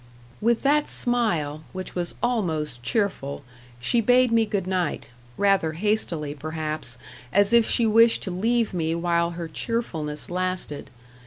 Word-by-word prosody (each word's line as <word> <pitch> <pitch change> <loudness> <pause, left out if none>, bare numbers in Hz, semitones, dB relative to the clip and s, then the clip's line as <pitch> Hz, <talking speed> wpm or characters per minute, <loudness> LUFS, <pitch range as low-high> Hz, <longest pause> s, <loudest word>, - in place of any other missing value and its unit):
With 235 +1 +2
that 295 +2 +3
smile, 170 -12 0
which 185 0 -6
was 175 -1 -3
almost 160 - -1
cheerful, 145 - -2 0.4
she 230 - +2
bade 250 +2 +4
me 225 -1 +3
good 200 -3 -1
night 185 -4 -2 0.3
rather 195 -5 +2
hastily, 170 -6 -1
perhaps, 155 -3 -5 0.3
as 200 - +3
if 235 -2 +5
she 235 - +3
wished 225 +1 +5
to 190 - -4
leave 225 +4 0
me 165 -2 -1
while 170 0 0
her 170 -1 -4
cheerfulness 160 -7 -3
lasted. 185 -4 -3
185 Hz, 140 wpm, -25 LUFS, 155-225 Hz, 0.4 s, if